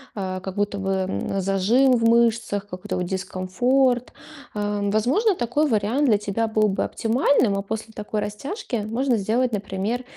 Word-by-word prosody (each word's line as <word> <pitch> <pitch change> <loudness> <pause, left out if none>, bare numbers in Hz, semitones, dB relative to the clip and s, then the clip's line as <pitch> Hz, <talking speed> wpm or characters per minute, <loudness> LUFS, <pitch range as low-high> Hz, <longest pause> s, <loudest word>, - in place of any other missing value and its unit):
а, 185 -2 -3
как 190 0 -6
будто 205 0 -1
бы, 195 0 -3
м, 190 +1 -1
зажим 210 +8 +3
в 230 -2 +1
мышцах, 230 -3 +2
какой-то 180 -1 -5
вот 180 - -1
дискомфорт. 245 +8 0 0.4
Э, 205 -1 -2
возможно, 310 - +2
такой 265 +5 0
вариант 225 +7 +1
для 210 - +5
тебя 210 +2 -1
был 215 -1 +2
бы 195 - 0
оптимальным, 225 -2 +2
а - - -1
после 220 +2 -6
такой 210 0 -4
растяжки 240 - -4
можно 245 +2 +1
сделать, 230 +4 0
например, 205 +4 -2
215 Hz, 160 wpm, -23 LUFS, 195-245 Hz, 0.4 s, для